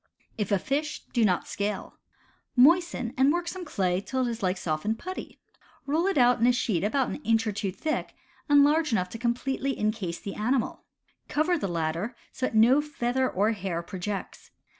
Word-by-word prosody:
If 210 Hz, -2 st, -3 dB
a 200 Hz, -, +4 dB
fish, 290 Hz, -, -2 dB
do 235 Hz, -, +3 dB
not 185 Hz, -4 st, +2 dB
scale. 205 Hz, +1 st, -4 dB, 0.6 s
Moisten 285 Hz, -3 st, +4 dB
and 265 Hz, +2 st, +5 dB
work 345 Hz, +1 st, -1 dB
some 370 Hz, +1 st, -5 dB
clay 190 Hz, -, 0 dB
till 260 Hz, +4 st, -1 dB
it -, -, -1 dB
is 230 Hz, -, -6 dB
like 185 Hz, -1 st, 0 dB
softened 175 Hz, +7 st, -1 dB
putty. 370 Hz, +9 st, -7 dB, 0.5 s
Roll 315 Hz, +6 st, +1 dB
it 390 Hz, -, 0 dB
out 245 Hz, -1 st, +5 dB
in 235 Hz, -, +4 dB
a -, -, +6 dB
sheet 215 Hz, -8 st, 0 dB
an 255 Hz, +5 st, 0 dB
inch 225 Hz, -5 st, +1 dB
or 215 Hz, -, 0 dB
two 200 Hz, -1 st, -2 dB
thick 310 Hz, +11 st, -3 dB, 0.3 s
and 290 Hz, -1 st, +7 dB
large 305 Hz, +1 st, +3 dB
enough 185 Hz, -5 st, +1 dB
to 225 Hz, -, -8 dB
com 235 Hz, 0 st, +1 dB
pletely 270 Hz, +1 st, -2 dB
incase 210 Hz, -5 st, -2 dB
the 200 Hz, -, -6 dB
animal. 240 Hz, +3 st, -1 dB, 0.4 s
Cover 315 Hz, +4 st, +1 dB
the 295 Hz, -, -2 dB
latter 170 Hz, +6 st, -2 dB, 0.2 s
so 255 Hz, -, -2 dB
that -, -, -6 dB
no 240 Hz, +6 st, +6 dB
feather 260 Hz, -3 st, -1 dB
or 205 Hz, +4 st, +1 dB
hair 185 Hz, -5 st, -3 dB
projects. 190 Hz, +3 st, -6 dB
235 Hz, 190 wpm, -27 LUFS, 200-280 Hz, 0.6 s, and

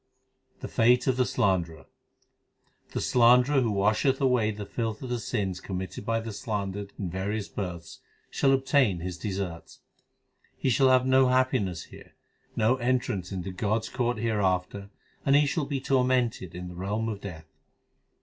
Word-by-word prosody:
The -, -, -4 dB
fate 120 Hz, +2 st, +3 dB
of 130 Hz, -, +2 dB
the 125 Hz, -1 st, +1 dB
slanderer: 85 Hz, -, 0 dB, 1.0 s
The -, -, -3 dB
slanderer 125 Hz, +3 st, +4 dB
who 120 Hz, -, +1 dB
washeth 110 Hz, +6 st, +2 dB
away 125 Hz, -5 st, +2 dB
the 105 Hz, -1 st, -5 dB
filth 110 Hz, +2 st, -4 dB
of 125 Hz, -, -6 dB
the 120 Hz, -, -1 dB
sins 95 Hz, -4 st, -2 dB
committed 95 Hz, +2 st, -6 dB
by 115 Hz, 0 st, +1 dB
the 115 Hz, -1 st, -6 dB
slandered 100 Hz, -3 st, -4 dB
in 95 Hz, -5 st, -4 dB
various 100 Hz, +3 st, -3 dB
births, 85 Hz, -4 st, -6 dB, 0.3 s
shall 135 Hz, -, +2 dB
obtain 135 Hz, -, +2 dB
his 90 Hz, 0 st, -5 dB
deserts. 95 Hz, -5 st, -5 dB, 0.8 s
He 130 Hz, -, 0 dB
shall 135 Hz, +2 st, +4 dB
have 130 Hz, 0 st, +4 dB
no 130 Hz, 0 st, +5 dB
happiness 125 Hz, -9 st, +1 dB
here, -, -, -15 dB, 0.4 s
no 115 Hz, +4 st, +2 dB
entrance 120 Hz, -7 st, -1 dB
into 95 Hz, -1 st, -4 dB
God 105 Hz, +4 st, -1 dB
s -, -, -6 dB
court 120 Hz, -1 st, -1 dB
hereafter, 100 Hz, -3 st, -1 dB, 0.3 s
and 140 Hz, -, +3 dB
he 145 Hz, +1 st, +5 dB
shall 145 Hz, +1 st, -1 dB
be 140 Hz, -1 st, -2 dB
tormented 125 Hz, -8 st, 0 dB
in 90 Hz, 0 st, -6 dB
the 90 Hz, -, -8 dB
realm 105 Hz, +5 st, -2 dB
of 105 Hz, -3 st, -4 dB
Death. 80 Hz, -5 st, -8 dB
110 Hz, 160 wpm, -27 LUFS, 95-125 Hz, 1.0 s, no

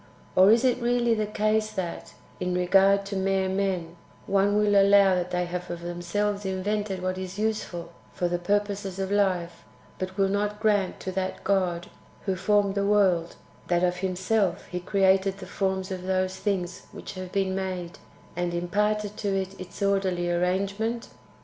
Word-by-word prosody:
Or 190 Hz, +2 st, +7 dB
is 230 Hz, +4 st, +5 dB
it 250 Hz, -1 st, +2 dB
really 240 Hz, -1 st, +2 dB
the 215 Hz, -1 st, 0 dB
case 215 Hz, +1 st, +1 dB
that, 185 Hz, -4 st, -5 dB, 0.2 s
in 180 Hz, 0 st, -1 dB
regard 195 Hz, +2 st, +4 dB
to 200 Hz, 0 st, -5 dB
mere 190 Hz, 0 st, +1 dB
men, 185 Hz, -3 st, -2 dB, 0.3 s
one 200 Hz, +1 st, +2 dB
will 210 Hz, -1 st, +3 dB
allow 200 Hz, -1 st, +6 dB
that 180 Hz, 0 st, -1 dB
they 180 Hz, 0 st, 0 dB
have 180 Hz, +1 st, -5 dB
of 170 Hz, 0 st, -5 dB
themselves 185 Hz, +4 st, -2 dB
invented 190 Hz, 0 st, -2 dB
what 185 Hz, 0 st, -1 dB
is 185 Hz, +1 st, -6 dB
useful 210 Hz, -6 st, -2 dB, 0.2 s
for 175 Hz, -, -1 dB
the 175 Hz, 0 st, -1 dB
purposes 200 Hz, 0 st, -1 dB
of 195 Hz, 0 st, -2 dB
life, 185 Hz, -4 st, 0 dB, 0.4 s
but 185 Hz, +1 st, -4 dB
will 195 Hz, -1 st, +3 dB
not 205 Hz, +1 st, -1 dB
grant 205 Hz, -3 st, +1 dB
to 185 Hz, -, -4 dB
that 190 Hz, 0 st, -3 dB
God 180 Hz, -3 st, 0 dB, 0.4 s
who 190 Hz, -2 st, 0 dB
formed 205 Hz, +1 st, +2 dB
the 200 Hz, 0 st, 0 dB
world, 190 Hz, -5 st, +2 dB, 0.3 s
that 175 Hz, 0 st, +2 dB
of 180 Hz, 0 st, +1 dB
Himself 190 Hz, 0 st, 0 dB
He 180 Hz, -, -3 dB
created 190 Hz, +1 st, +2 dB
the 195 Hz, -, -8 dB
forms 190 Hz, 0 st, -2 dB
of 185 Hz, -1 st, -4 dB
those 185 Hz, 0 st, 0 dB
things 185 Hz, -4 st, -2 dB
^Yhich -, -, -7 dB
have 185 Hz, -1 st, -7 dB
been 195 Hz, -1 st, 0 dB
made, 185 Hz, -2 st, -4 dB, 0.4 s
and 175 Hz, 0 st, -1 dB
imparted 210 Hz, +4 st, 0 dB
to 200 Hz, -2 st, -1 dB
it 190 Hz, 0 st, -4 dB
its 185 Hz, +2 st, -7 dB
orderly 190 Hz, -3 st, +1 dB
arrangement 200 Hz, +6 st, -1 dB
190 Hz, 170 wpm, -26 LUFS, 180-205 Hz, 0.4 s, Or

